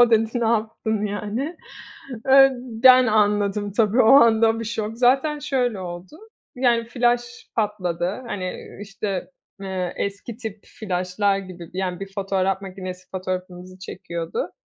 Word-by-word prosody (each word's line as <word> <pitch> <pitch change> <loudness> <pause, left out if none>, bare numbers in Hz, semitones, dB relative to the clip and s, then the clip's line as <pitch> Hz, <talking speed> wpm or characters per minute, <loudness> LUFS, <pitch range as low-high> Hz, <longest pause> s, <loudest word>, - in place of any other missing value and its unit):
o 240 -1 +6
dedi: 225 -1 +3
"Ne 230 - +1
yaptın?" 220 -1 -1
yani, 215 - -4 0.7
ııı, 270 0 +8 0.3
ben 255 -1 +8
anladım 205 -1 +1
tabii 225 +2 +4
o 220 - +6
anda 225 -4 +6
bir 230 - -4
şok! 215 -1 -3
Zaten 270 +5 +3
şöyle 250 -7 -1
oldu, 180 - -8 0.4
yani 240 -2 +2
flaş 240 +1 -1
patladı, 200 0 -2
hani, 195 -5 -4 0.3
ııı, - - -11
işte, 200 -2 -4 0.3
eee, 185 -2 -3
eski 200 +3 -4
tip 220 -4 -7
flaşlar 195 0 -1
gibi, 185 -3 -8
d - - -8
yani, 185 -2 -2
bir 195 0 -8
fotoğraf 195 -1 0
makinesi 185 -1 -8
fotoğrafımızı 185 0 -5
çekiyordu. 185 - -5
210 Hz, 140 wpm, -23 LUFS, 190-235 Hz, 0.7 s, ııı